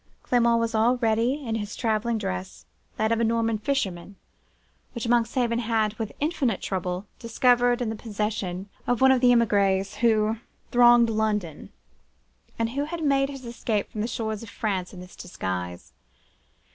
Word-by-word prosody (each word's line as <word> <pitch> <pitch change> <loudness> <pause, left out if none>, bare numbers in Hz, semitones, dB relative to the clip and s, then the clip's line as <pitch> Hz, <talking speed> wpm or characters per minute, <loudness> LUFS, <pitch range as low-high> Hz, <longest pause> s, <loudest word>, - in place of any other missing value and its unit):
Clement 235 -1 +3
was 230 0 -1
already 235 +4 +1
in 225 - -2
his 210 -2 -4
travelling 225 0 0
dress, 190 -2 -5 0.3
that 220 +1 +1
of 230 - +2
a - - +2
Norman 230 -1 +1
fisherman, 200 -7 -2 0.8
which 235 -1 -4
Monkshaven 235 0 +1
had, 220 -2 0
with 220 -2 -3
infinite 285 - 0
trouble, 185 0 -3
discovered 245 +1 +2
in 230 - -2
the - - -4
possession 210 -4 -3 0.2
of 245 - +1
one 265 0 +6
of 260 -2 +3
the 250 -1 +6
emigres 200 -4 +2
who 220 -1 +2 0.3
thronged 240 -1 +6
London, 210 -7 -2 0.9
and 230 0 -1
who 280 +3 -1
had 330 +1 -5
made 275 -1 +2
his 270 -2 -8
escape 230 -3 -2
from 210 - -4
the 220 - -1
shores 220 -3 -3
of 230 - -9
France 200 -5 -3
in 180 - -10
this 180 0 -12
disguise. 90 - -5
225 Hz, 160 wpm, -25 LUFS, 205-240 Hz, 0.9 s, one